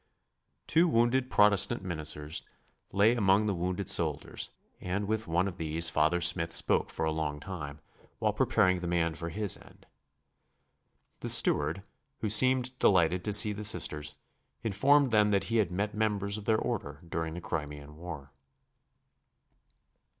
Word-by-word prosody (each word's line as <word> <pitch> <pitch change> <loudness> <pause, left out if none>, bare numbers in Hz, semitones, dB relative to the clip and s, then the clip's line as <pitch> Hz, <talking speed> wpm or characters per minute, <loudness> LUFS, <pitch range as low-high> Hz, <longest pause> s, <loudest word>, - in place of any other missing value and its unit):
Two 165 +3 +3
wounded 125 -1 +1
Protestant 105 -4 +3
ministers 75 -3 -3 0.5
lay 100 +4 +4
among 100 -2 +3
the 105 - 0
wounded 90 +2 -3
soldiers, 80 -4 0 0.3
and 95 +3 -3
with 110 -1 -2
one 85 +3 +1
of 90 -3 -7
these 80 +1 +2
Father 80 +3 +1
Smith 85 0 +3
spoke - - 0
for 80 - -3
a 80 - 0
long 75 -2 -3
time 75 -4 -8 0.4
while - - 0
preparing 90 -1 +2
the 90 - -5
man 85 -1 0
for 85 +1 -6
his 100 +2 -2
end. - - -19 1.3
The - - -4
steward, 80 +6 +3 0.4
who 110 - -1
seemed 130 +3 +2
delighted 90 -1 +3
to 105 - 0
see 105 +1 +5
the 105 +1 -7
Sisters, 75 -8 -2 0.5
informed 135 +6 +3
them 105 -1 +4
that 100 -1 +1
he - - +3
had 105 -6 +2
met 100 +4 -3
members 105 -2 -1
of 105 -1 -6
their 110 0 +2
order 90 - -4
during 80 -1 -4
the - - -5
Crimean 75 -3 -6
War. 80 -4 -9
90 Hz, 150 wpm, -29 LUFS, 80-105 Hz, 1.3 s, see